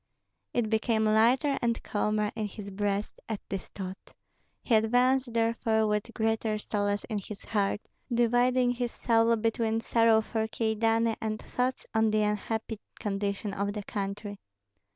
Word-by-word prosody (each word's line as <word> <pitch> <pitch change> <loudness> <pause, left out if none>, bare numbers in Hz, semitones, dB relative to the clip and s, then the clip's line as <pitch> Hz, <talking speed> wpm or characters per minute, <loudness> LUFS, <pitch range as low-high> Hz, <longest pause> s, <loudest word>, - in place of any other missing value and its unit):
It 240 -2 0
became 220 0 +2
lighter 240 +7 +3
and 235 -1 0
calmer 210 0 0
in 215 -2 -2
his 200 0 -8
breast 205 +1 -2
at 220 -3 -2
this 195 -2 -4
thought; 190 -1 -8 0.5
he 240 - 0
advanced 245 +3 +3
therefore 225 -1 +1
with 210 +2 -1
greater 220 -1 0
solace 205 -1 -1
in 215 -3 -3
his 200 +1 -9
heart, 205 -1 0 0.3
dividing 245 +1 +3
his 245 -1 -2
soul 230 0 +3
between 225 0 0
sorrow 225 -1 +4
for 220 0 -2
Kyedani 225 0 +1
and 215 -1 -2
thoughts 255 +1 -2
on 220 -1 +3
the 215 0 +2
unhappy 215 +1 -2 0.2
condition 200 0 -2
of 200 +1 -1
the 210 -1 -5
country. 200 0 -4
220 Hz, 145 wpm, -29 LUFS, 210-230 Hz, 0.5 s, sorrow